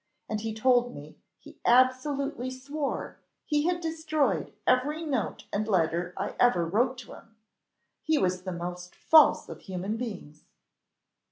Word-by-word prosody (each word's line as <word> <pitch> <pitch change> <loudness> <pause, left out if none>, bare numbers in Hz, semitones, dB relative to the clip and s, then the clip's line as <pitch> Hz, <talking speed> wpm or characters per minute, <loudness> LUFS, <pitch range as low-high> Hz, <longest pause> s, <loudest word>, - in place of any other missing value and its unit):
And 215 -1 -3
he 225 0 -3
told 245 +2 +2
me, 145 +2 -11 0.2
he - - -16
absolutely 255 +1 +2
swore, 275 +3 -4 0.3
he 295 +1 +1
had 355 -1 +1
destroyed 315 -3 -1
every 290 +6 +2
note 260 -9 -2
and 210 +1 -1
letter 175 -2 0
I - - -3
ever 185 -9 +4
wrote 240 +9 +1
to - - -12
him. 225 - -16 0.7
He 315 -1 +1
was 185 -7 0
the 185 0 -5
most 175 +1 -6
false 315 -1 +5
of - - -9
human 190 +4 -4
beings!" 190 -11 -7
245 Hz, 145 wpm, -28 LUFS, 185-280 Hz, 0.7 s, false